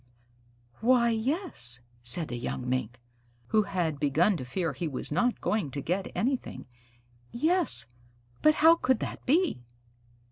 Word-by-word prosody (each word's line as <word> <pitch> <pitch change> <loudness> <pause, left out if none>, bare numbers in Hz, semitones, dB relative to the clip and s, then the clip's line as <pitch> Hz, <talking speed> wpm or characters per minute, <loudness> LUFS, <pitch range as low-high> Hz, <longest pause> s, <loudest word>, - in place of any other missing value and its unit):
"Why, 240 0 +3
yes," 225 - +3 0.2
said 130 +7 +2
the 120 - -5
young 125 +1 -5
Mink, 125 -2 -3 0.5
who 215 - +3
had 165 -7 -3
begun 155 +8 +2
to 130 - -7
fear 165 +3 -3
he 160 +6 -4
was 135 -1 -4
not 245 +10 0
going 210 -9 -1
to 140 - -6
get 180 +7 -3
anything. 255 +2 -3 0.7
"Yes, 310 - +1 0.6
but 305 0 +4
how 325 +2 +5
could 260 -5 +1
that - - -6
be?" 310 - +1
185 Hz, 140 wpm, -27 LUFS, -, 0.7 s, how